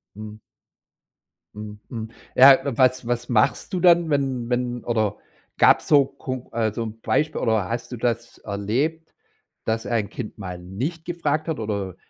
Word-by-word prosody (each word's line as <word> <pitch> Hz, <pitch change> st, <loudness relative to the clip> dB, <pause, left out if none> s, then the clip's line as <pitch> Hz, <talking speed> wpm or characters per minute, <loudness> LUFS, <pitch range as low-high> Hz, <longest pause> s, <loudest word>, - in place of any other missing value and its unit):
Mhm. 110 Hz, 0 st, -9 dB, 1.2 s
Mhm, 105 Hz, 0 st, -8 dB
mhm. 115 Hz, -2 st, -5 dB, 0.3 s
Ja, 135 Hz, +1 st, +9 dB, 0.2 s
was 130 Hz, -1 st, +3 dB
was 120 Hz, 0 st, -2 dB
machst 120 Hz, -, +1 dB
du 180 Hz, -, 0 dB
dann, 170 Hz, -2 st, +5 dB
wenn 135 Hz, -4 st, -1 dB
wenn 125 Hz, -1 st, -1 dB
oder 110 Hz, -3 st, 0 dB, 0.4 s
gab's -, -, +5 dB
so 145 Hz, -3 st, +6 dB
kon 130 Hz, -3 st, -7 dB
also 115 Hz, 0 st, -1 dB
'n 110 Hz, 0 st, -7 dB
Beispiel 155 Hz, +1 st, 0 dB
oder 110 Hz, -4 st, +1 dB
hast 120 Hz, +1 st, -4 dB
du 125 Hz, -, -5 dB
das 115 Hz, 0 st, -2 dB
erlebt, 125 Hz, +11 st, -2 dB, 0.5 s
dass 110 Hz, +1 st, -1 dB
ein 110 Hz, -4 st, -1 dB
Kind 115 Hz, -3 st, -7 dB
mal 90 Hz, -3 st, -6 dB
nicht 130 Hz, -, -5 dB
gefragt 165 Hz, -2 st, -1 dB
hat 160 Hz, -7 st, -2 dB
oder, 100 Hz, -4 st, -3 dB
120 Hz, 155 wpm, -23 LUFS, 110-140 Hz, 1.2 s, Ja